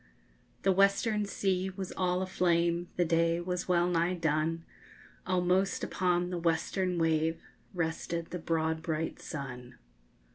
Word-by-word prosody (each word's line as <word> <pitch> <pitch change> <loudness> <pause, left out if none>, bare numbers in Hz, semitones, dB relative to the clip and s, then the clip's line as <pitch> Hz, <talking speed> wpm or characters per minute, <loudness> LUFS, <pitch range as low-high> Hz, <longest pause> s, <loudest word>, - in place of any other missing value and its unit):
The 195 - +4
western 200 +2 +3
sea 190 -1 0
was 190 -1 -6
all 180 0 +1
aflame, 175 -2 +1
The 175 - +2
day 165 +1 +2
was 180 +1 -3
well 175 -1 +3
nigh 175 +1 +1
done! 165 0 0 0.6
Almost 185 +1 +1
upon 180 -1 0
the 175 - -2
western 175 +2 0
wave 160 0 +1 0.4
_Rested 165 0 -2
the 180 - -4
broad 160 -1 0
bright 160 -1 -3
sun. 125 -4 -7
175 Hz, 130 wpm, -31 LUFS, 165-185 Hz, 0.6 s, The